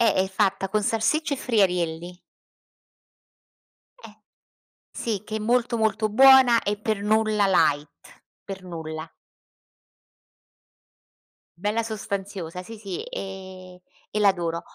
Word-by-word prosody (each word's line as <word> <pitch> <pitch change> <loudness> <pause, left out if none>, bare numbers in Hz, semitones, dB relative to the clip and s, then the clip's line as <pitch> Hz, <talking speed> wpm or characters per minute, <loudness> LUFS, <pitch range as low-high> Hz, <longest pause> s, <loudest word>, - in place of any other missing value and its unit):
Eh, 230 - +4
è 190 - +2
fatta 195 -1 0
con 210 +2 0
salsiccia 280 +8 0
e - - -8
friarielli. 180 -7 -1 1.8
Eh, - - -13 0.7
sì 215 -5 -3
che 215 0 -5
è - - -1
molto 235 +2 +1
molto, 220 0 +1
buona 260 0 +6
e 205 +1 -1
per 215 -1 -2
nulla 215 -1 +2
light, 150 -6 +2 0.6
per 195 -1 -7
nulla. 160 -2 -7 2.5
Bella 210 +4 0
sostanziosa, 200 -5 -5
sì, 225 +4 -10
sì 195 -4 -6
e 185 -1 -9 0.3
e 210 - -1
l'adoro. 175 -5 +1
200 Hz, 110 wpm, -24 LUFS, 180-220 Hz, 2.5 s, buona